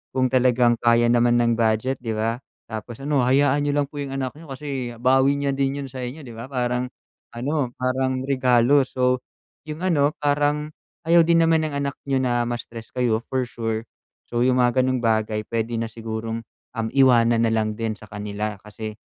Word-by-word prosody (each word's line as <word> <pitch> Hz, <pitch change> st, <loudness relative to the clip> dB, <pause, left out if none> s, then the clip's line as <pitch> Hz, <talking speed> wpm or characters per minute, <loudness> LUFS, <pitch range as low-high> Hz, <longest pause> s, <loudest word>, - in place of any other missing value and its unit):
kung 130 Hz, -1 st, +2 dB
talagang 125 Hz, -2 st, +3 dB
kaya 120 Hz, 0 st, +4 dB
naman 120 Hz, 0 st, +4 dB
ng 120 Hz, -1 st, +2 dB
budget, 115 Hz, +4 st, +1 dB
'di 115 Hz, -3 st, -3 dB
ba? 115 Hz, +2 st, -1 dB, 0.2 s
Tapos 110 Hz, +1 st, -7 dB
ano, 140 Hz, -4 st, +1 dB
hayaan 140 Hz, +2 st, +3 dB
n'yo 145 Hz, -, 0 dB
lang 145 Hz, -1 st, +1 dB
po 145 Hz, -, -7 dB
yung 135 Hz, -1 st, -4 dB
anak 130 Hz, -2 st, -2 dB
n'yo 165 Hz, -, -13 dB
kasi 130 Hz, -4 st, -5 dB
bawi 130 Hz, +3 st, +3 dB
niya 140 Hz, 0 st, -1 dB
din 135 Hz, +1 st, -1 dB
'yun 135 Hz, -, -6 dB
sa 130 Hz, -, -7 dB
inyo, 130 Hz, +5 st, -6 dB
'di 120 Hz, -, -10 dB
ba? 115 Hz, +2 st, -8 dB
Parang 125 Hz, -1 st, -1 dB, 0.5 s
ano, 130 Hz, 0 st, -1 dB
parang 130 Hz, 0 st, -1 dB
regalo. 130 Hz, 0 st, +3 dB
So, 125 Hz, 0 st, +1 dB, 0.5 s
yung 155 Hz, +3 st, -6 dB
ano, 150 Hz, -5 st, +2 dB
parang 145 Hz, +1 st, 0 dB, 0.3 s
ayaw 165 Hz, 0 st, +5 dB
din 165 Hz, -1 st, +5 dB
naman 160 Hz, -1 st, +3 dB
ng 145 Hz, -, -5 dB
anak 140 Hz, -1 st, -3 dB
n'yo 135 Hz, -1 st, +1 dB
na 120 Hz, -1 st, +1 dB
ma-stress 115 Hz, -1 st, -6 dB
kayo 120 Hz, -3 st, +1 dB
for 130 Hz, -1 st, 0 dB
sure, 115 Hz, -2 st, -3 dB, 0.5 s
so 120 Hz, -, -1 dB
yung 125 Hz, -1 st, +3 dB
mga 120 Hz, +1 st, +2 dB
gano'ng 130 Hz, -1 st, +1 dB
bagay, 110 Hz, -1 st, +1 dB
puwede 115 Hz, +1 st, -2 dB
na 115 Hz, 0 st, -3 dB
sigurong, 115 Hz, 0 st, -4 dB, 0.3 s
um, 115 Hz, -2 st, -3 dB
iwanan 120 Hz, -3 st, +5 dB
na 115 Hz, -, +2 dB
lang 110 Hz, -1 st, 0 dB
din 115 Hz, 0 st, -2 dB
sa 110 Hz, -, -13 dB
kanila 105 Hz, +1 st, -4 dB
kasi, 105 Hz, +1 st, -7 dB
125 Hz, 190 wpm, -23 LUFS, 115-140 Hz, 0.5 s, ayaw